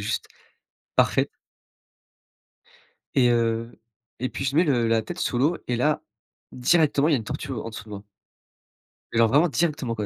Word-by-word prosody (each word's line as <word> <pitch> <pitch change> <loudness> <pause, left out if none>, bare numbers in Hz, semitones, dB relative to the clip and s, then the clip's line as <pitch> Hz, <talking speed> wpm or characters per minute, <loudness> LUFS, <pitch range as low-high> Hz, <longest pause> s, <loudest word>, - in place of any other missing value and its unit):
juste - - -3 0.7
parfaite. - - +3 1.9
Et 125 -3 +5
heu, 115 0 0 0.4
et 130 +2 -2
puis - - -5
je 135 +1 -1
mets 170 - +5
le 120 -7 +1
la 115 -1 +2
tête 175 +1 -7
sous 120 - -1
l'eau 150 +7 +2
et 125 - 0
là, 150 +5 +1 0.5
directement 145 +2 +3
il - - +2
y - - +4
a - - +4
une 110 - -5
tortue, 140 +3 -5
heu, 120 - -3
en 115 - -6
dessous 110 -1 -8
de - - -14
moi 100 -1 -8 1.1
alors 115 0 +5
vraiment 150 +8 +4
directement 150 -6 -1
quoi, 105 -2 -3
125 Hz, 180 wpm, -25 LUFS, 115-150 Hz, 1.9 s, Et